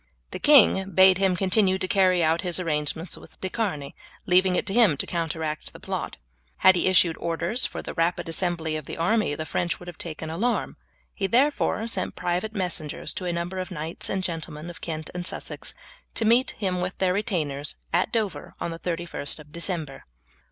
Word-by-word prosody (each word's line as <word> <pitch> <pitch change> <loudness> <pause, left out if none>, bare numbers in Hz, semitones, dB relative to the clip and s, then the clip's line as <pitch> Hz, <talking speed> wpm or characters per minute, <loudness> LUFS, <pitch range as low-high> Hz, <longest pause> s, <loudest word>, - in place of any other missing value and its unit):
The - - -5
king 215 -9 +6
bade 190 0 +6
him 190 -2 +3
continue 190 +1 +3
to 185 - -2
carry 185 -2 +3
out 160 +1 +2
his 180 -2 +2
arrangements 160 0 -1
with - - -14
De 190 - -3
Charny, 180 -11 -2 0.3
leaving 185 0 +4
it - - 0
to 195 - -1
him 215 -11 +5
to - - -2
counteract 160 -2 -3
the - - -11
plot. - - -4 0.4
Had 190 - +6
he 175 - +1
issued 175 -3 +4
orders 170 +9 0
for - - -7
the - - -6
rapid 165 +1 0
assembly 165 -1 -1
of 155 -2 -4
the - - -7
army 180 -1 +1
the 155 - -4
French 175 +1 -1
would 175 - -12
have 175 -3 -9
taken 160 -1 -5
alarm. 230 +9 -1 0.4
He 195 - -1
therefore 255 -1 +2
sent 195 -5 -3
private 180 +5 -2
messengers 175 -6 -2
to 185 - -5
a 175 - 0
number 170 +2 -3
of 185 0 -4
knights 165 -2 -3
and 190 -1 -1
gentlemen 165 -1 -4
of 170 - -14
Kent 155 -2 -5
and 175 0 -3
Sussex - - -4 0.4
to 225 - +2
meet 240 +4 +3
him 185 -3 -1
with 180 +1 -3
their 185 -1 +2
retainers 155 - -2 0.2
at 175 +2 +2
Dover 215 -5 -2
on 170 - -3
the 165 - -7
31st 170 -4 -3
of 150 -1 -14
December. 170 -4 -4
180 Hz, 195 wpm, -25 LUFS, 165-190 Hz, 0.4 s, king